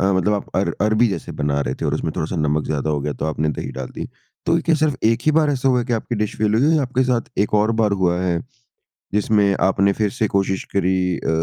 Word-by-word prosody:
मतलब 95 Hz, +2 st, +2 dB
आप 100 Hz, -, -4 dB
अर -, -, +1 dB
अरबी 110 Hz, +3 st, +3 dB
जैसे 95 Hz, -, -5 dB
बना 70 Hz, -1 st, +1 dB
रहे 65 Hz, -1 st, -2 dB
थे -, -, -2 dB
और -, -, 0 dB
उसमें -, -, -2 dB
थोड़ा-सा 80 Hz, +3 st, -2 dB
नमक 75 Hz, 0 st, 0 dB
ज़्यादा 75 Hz, 0 st, -1 dB
हो 75 Hz, -1 st, 0 dB
गया 75 Hz, +1 st, -2 dB
तो 70 Hz, -, -5 dB
आपने 80 Hz, 0 st, -1 dB
दही -, -, -4 dB
डाल -, -, -4 dB
दी। -, -, -5 dB, 0.4 s
तो 165 Hz, -, +3 dB
क्या 165 Hz, -, +4 dB
सिर्फ़ 155 Hz, -3 st, +1 dB
एक 115 Hz, +1 st, +3 dB
ही -, -, +6 dB
बार 155 Hz, -2 st, +3 dB
ऐसा 135 Hz, -1 st, 0 dB
हुआ 125 Hz, -2 st, +3 dB
कि 125 Hz, -, -3 dB
आपकी 115 Hz, +1 st, -2 dB
डिश 105 Hz, 0 st, -2 dB
फ़ेल 105 Hz, -1 st, +2 dB
हुई 145 Hz, +8 st, +3 dB
या 150 Hz, -, +2 dB
आपके 130 Hz, 0 st, 0 dB
साथ 125 Hz, -2 st, -1 dB
एक -, -, -4 dB
और 110 Hz, +2 st, +2 dB
बार 105 Hz, -2 st, +2 dB
हुआ 90 Hz, -1 st, +2 dB
है, 90 Hz, -2 st, 0 dB, 0.8 s
जिसमें 105 Hz, 0 st, +3 dB, 0.2 s
आपने 100 Hz, +1 st, +2 dB
फिर 105 Hz, -2 st, +2 dB
से 125 Hz, -3 st, -1 dB
कोशिश 95 Hz, -1 st, 0 dB
करी 95 Hz, -1 st, +2 dB, 0.2 s
अ, -, -, -5 dB
105 Hz, 250 wpm, -21 LUFS, 85-120 Hz, 0.8 s, ही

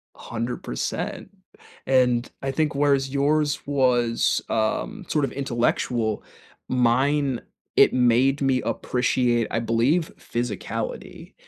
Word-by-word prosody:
100%, 115 Hz, -, -4 dB, 0.6 s
and 125 Hz, -2 st, +2 dB
I 135 Hz, -, -2 dB
think 150 Hz, +1 st, 0 dB
whereas 140 Hz, -1 st, +2 dB
yours 145 Hz, +2 st, +1 dB
was, 125 Hz, -4 st, +2 dB
um, 110 Hz, -, -1 dB
sort 150 Hz, -3 st, +1 dB
of 130 Hz, -, -6 dB
intellectual, 120 Hz, -4 st, -1 dB, 0.5 s
mine, 130 Hz, +2 st, +2 dB, 0.3 s
it -, -, +6 dB
made 130 Hz, +3 st, +3 dB
me 135 Hz, -2 st, +2 dB
appreciate, 125 Hz, -2 st, 0 dB
I 115 Hz, -, 0 dB
believe, 120 Hz, +9 st, +1 dB
physicality, 120 Hz, -5 st, -5 dB
125 Hz, 100 wpm, -24 LUFS, 120-140 Hz, 0.6 s, it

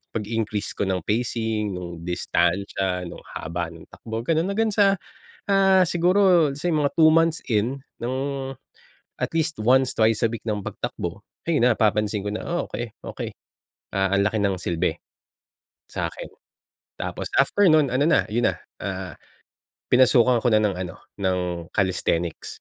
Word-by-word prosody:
pag-increase 110 Hz, -1 st, -2 dB
ko 100 Hz, -, -2 dB
ng 90 Hz, -3 st, -1 dB
pacing, 110 Hz, -2 st, -1 dB
nung 85 Hz, -2 st, -7 dB
distansya, 90 Hz, +2 st, 0 dB
nung 85 Hz, -, -8 dB, 0.2 s
haba 85 Hz, +1 st, -3 dB
ng 85 Hz, -1 st, -12 dB
takbo 115 Hz, 0 st, -6 dB
ganon 165 Hz, +5 st, +1 dB
hanggang 215 Hz, +3 st, +1 dB
sa, 200 Hz, -1 st, +4 dB, 0.5 s
ah, 195 Hz, -2 st, +5 dB
siguro 175 Hz, -2 st, +4 dB
let's 140 Hz, +1 st, -7 dB
say 175 Hz, +1 st, 0 dB
mga 145 Hz, -2 st, +2 dB
2 160 Hz, -1 st, +8 dB
months 165 Hz, 0 st, +3 dB
in 120 Hz, +4 st, +1 dB, 0.2 s
ng 125 Hz, +2 st, -1 dB, 1.1 s
at -, -, 0 dB
least 160 Hz, -5 st, -1 dB
once, 130 Hz, +3 st, +4 dB
twice 110 Hz, 0 st, +3 dB
a -, -, +5 dB
week 115 Hz, -, -5 dB
ng 105 Hz, -1 st, -1 dB
pagtakbo 85 Hz, +4 st, -5 dB, 0.3 s
ayun 165 Hz, -5 st, +2 dB
na 115 Hz, -, +1 dB
napapansin 105 Hz, -1 st, +1 dB
ko -, -, -1 dB
na 110 Hz, -, -3 dB
oh 175 Hz, 0 st, -1 dB
okey, 120 Hz, 0 st, -4 dB, 0.2 s
okey -, -, -5 dB, 0.7 s
ah 95 Hz, 0 st, +1 dB
ang 100 Hz, -, +3 dB
laki 110 Hz, -, -4 dB
ng 95 Hz, -2 st, +1 dB
silbe, 85 Hz, -2 st, -1 dB, 0.9 s
sakin. -, -, -4 dB, 0.7 s
Tapos -, -, -4 dB
after 205 Hz, -3 st, +4 dB
nun 155 Hz, -2 st, +5 dB
ano 130 Hz, -, +2 dB
na, 160 Hz, +2 st, +3 dB
yun 115 Hz, +3 st, +1 dB
na, -, -, -8 dB, 0.2 s
ah, 95 Hz, -2 st, -4 dB, 0.8 s
pinasukan 125 Hz, -1 st, +5 dB
ko -, -, +5 dB
na 110 Hz, -, +5 dB
ng 105 Hz, -3 st, +1 dB
ano, 90 Hz, -2 st, -5 dB, 0.2 s
ng 95 Hz, -2 st, 0 dB, 0.3 s
calisthenics. 90 Hz, -3 st, -1 dB
110 Hz, 155 wpm, -24 LUFS, 95-155 Hz, 1.1 s, 2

